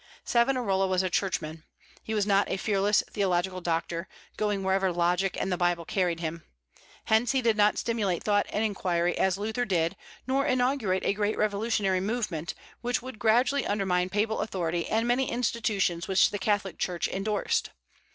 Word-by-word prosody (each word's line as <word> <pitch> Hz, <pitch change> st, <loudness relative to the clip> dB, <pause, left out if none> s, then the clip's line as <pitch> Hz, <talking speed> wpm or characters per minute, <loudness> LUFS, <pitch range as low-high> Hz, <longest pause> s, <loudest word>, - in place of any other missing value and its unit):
Savonarola 235 Hz, -6 st, +2 dB
was 185 Hz, 0 st, +1 dB
a 185 Hz, -, -2 dB
churchman. 160 Hz, -5 st, -2 dB, 0.4 s
He 220 Hz, -, -4 dB
was 205 Hz, -2 st, +1 dB
not 200 Hz, -1 st, +2 dB
a -, -, -1 dB
fearless 205 Hz, +1 st, +2 dB
theological 185 Hz, -2 st, 0 dB
doctor, 170 Hz, +1 st, -2 dB, 0.3 s
going 205 Hz, -2 st, -1 dB
wherever 190 Hz, 0 st, +1 dB
logic 175 Hz, +2 st, +1 dB
and 190 Hz, -, -1 dB
the 180 Hz, -, 0 dB
Bible 175 Hz, -1 st, 0 dB
carried 175 Hz, -3 st, 0 dB
him. 165 Hz, 0 st, -4 dB, 0.6 s
Hence, 220 Hz, +3 st, +3 dB
he 265 Hz, -, +2 dB
did 230 Hz, -2 st, +3 dB
not 210 Hz, 0 st, +3 dB
stimulate 210 Hz, -7 st, -1 dB
thought 205 Hz, -1 st, +2 dB
and 210 Hz, -, -1 dB
inquiry 175 Hz, -4 st, 0 dB
as 190 Hz, -1 st, +1 dB
Luther 220 Hz, +4 st, -2 dB
did, 170 Hz, -7 st, 0 dB, 0.3 s
nor 270 Hz, +1 st, +1 dB
inaugurate 250 Hz, -8 st, +1 dB
a -, -, +2 dB
great 210 Hz, +1 st, -1 dB
revolutionary 205 Hz, -2 st, +1 dB
movement, 195 Hz, -6 st, -2 dB, 0.3 s
which 245 Hz, 0 st, -1 dB
would 255 Hz, -4 st, -8 dB
gradually 245 Hz, +5 st, +2 dB
undermine 185 Hz, -3 st, 0 dB
papal 215 Hz, +3 st, 0 dB
authority 175 Hz, -5 st, -2 dB
and 225 Hz, +2 st, 0 dB
many 250 Hz, +2 st, +1 dB
institutions 215 Hz, -7 st, 0 dB
which 190 Hz, -1 st, +4 dB
the 205 Hz, -, -3 dB
Catholic 200 Hz, -2 st, -1 dB
Church 175 Hz, -2 st, -1 dB
indorsed. 205 Hz, +2 st, -1 dB
200 Hz, 165 wpm, -28 LUFS, 180-220 Hz, 0.6 s, which